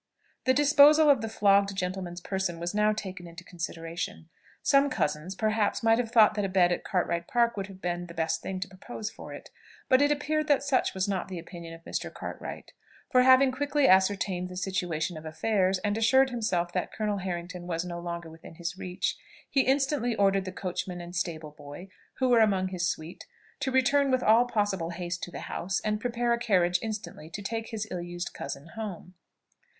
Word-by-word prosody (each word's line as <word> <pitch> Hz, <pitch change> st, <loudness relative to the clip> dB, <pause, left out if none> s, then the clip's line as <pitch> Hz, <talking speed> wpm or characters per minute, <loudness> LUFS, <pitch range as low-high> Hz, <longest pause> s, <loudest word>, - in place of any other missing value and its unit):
The 260 Hz, -, +4 dB
disposal 295 Hz, +2 st, +7 dB
of 270 Hz, -5 st, +2 dB
the 225 Hz, -, -3 dB
flogged 200 Hz, -2 st, +3 dB
gentleman's 180 Hz, -2 st, -4 dB
person 190 Hz, -2 st, -2 dB
was 170 Hz, +2 st, -3 dB
now 210 Hz, +1 st, +3 dB
taken 190 Hz, -4 st, -6 dB
into 170 Hz, +1 st, -11 dB
consideration. 165 Hz, -1 st, -6 dB, 0.3 s
Some 280 Hz, 0 st, +4 dB
cousins, 155 Hz, -, -2 dB
perhaps, 215 Hz, +1 st, 0 dB
might 225 Hz, +1 st, +4 dB
have 240 Hz, -2 st, -1 dB
thought 220 Hz, -3 st, +6 dB
that 210 Hz, -1 st, -1 dB
a 195 Hz, -, -1 dB
bed 180 Hz, -2 st, +4 dB
at 175 Hz, -, -1 dB
Cartwright 170 Hz, -2 st, -1 dB
Park 235 Hz, -1 st, +2 dB
would 195 Hz, -2 st, -4 dB
have 190 Hz, -1 st, -13 dB
been 175 Hz, 0 st, -2 dB
the 170 Hz, -, -11 dB
best 160 Hz, 0 st, -1 dB
thing 190 Hz, -1 st, -4 dB
to 195 Hz, -, -2 dB
propose 210 Hz, +3 st, -7 dB
for -, -, -10 dB
it; -, -, -10 dB, 0.4 s
but 260 Hz, +1 st, +5 dB
it 290 Hz, -, +4 dB
appeared 305 Hz, +1 st, 0 dB
that 285 Hz, -2 st, +3 dB
such 275 Hz, -7 st, +1 dB
was 190 Hz, +1 st, 0 dB
not 195 Hz, -2 st, -2 dB
the 185 Hz, -, -6 dB
opinion 170 Hz, -1 st, -9 dB
of 165 Hz, -, -16 dB
Mr. -, -, -4 dB
Cartwright; -, -, -8 dB, 0.4 s
for 255 Hz, -, +6 dB
having 260 Hz, +1 st, +6 dB
quickly 285 Hz, +1 st, +1 dB
ascertained 190 Hz, -1 st, +3 dB
the 180 Hz, -, -8 dB
situation 180 Hz, -3 st, -2 dB
of 155 Hz, -, -9 dB
affairs, 185 Hz, +4 st, +1 dB
and 205 Hz, 0 st, +1 dB
assured 265 Hz, +4 st, +4 dB
himself 180 Hz, -8 st, -1 dB
that 180 Hz, -, -2 dB
Colonel 210 Hz, -2 st, -2 dB
Harrington 175 Hz, -1 st, -5 dB
was 165 Hz, 0 st, -2 dB
no 175 Hz, -1 st, -5 dB
longer 170 Hz, -1 st, -6 dB
within 165 Hz, 0 st, -13 dB
his 175 Hz, +2 st, -5 dB
reach, 180 Hz, 0 st, -2 dB, 0.4 s
he 275 Hz, -, +4 dB
instantly 265 Hz, -3 st, +1 dB
ordered 195 Hz, -2 st, +2 dB
the 185 Hz, -, -4 dB
coachman 180 Hz, -1 st, -4 dB
and 175 Hz, +1 st, -8 dB
stable 160 Hz, -3 st, -3 dB
boy, 145 Hz, +5 st, -11 dB, 0.3 s
who 260 Hz, -, +1 dB
were 240 Hz, -2 st, +6 dB
among 195 Hz, -4 st, +3 dB
his 180 Hz, -2 st, -1 dB
suite, 160 Hz, +3 st, -6 dB, 0.3 s
to 265 Hz, -, -1 dB
return 275 Hz, +2 st, +3 dB
with 255 Hz, -1 st, +2 dB
all 225 Hz, +3 st, +5 dB
possible 205 Hz, -7 st, -1 dB
haste 175 Hz, 0 st, -4 dB
to -, -, -5 dB
the -, -, -7 dB
house, 185 Hz, +2 st, -2 dB
and 210 Hz, 0 st, -1 dB
prepare 240 Hz, 0 st, 0 dB
a 235 Hz, -, -1 dB
carriage 180 Hz, -6 st, +2 dB
instantly 215 Hz, -7 st, -6 dB
to 205 Hz, +5 st, -7 dB
take 225 Hz, +2 st, -3 dB
his 220 Hz, -2 st, -4 dB
ill 180 Hz, -, -3 dB
used 175 Hz, 0 st, -5 dB
cousin 140 Hz, +3 st, -7 dB
home. 205 Hz, -5 st, -7 dB
190 Hz, 200 wpm, -28 LUFS, 175-230 Hz, 0.4 s, disposal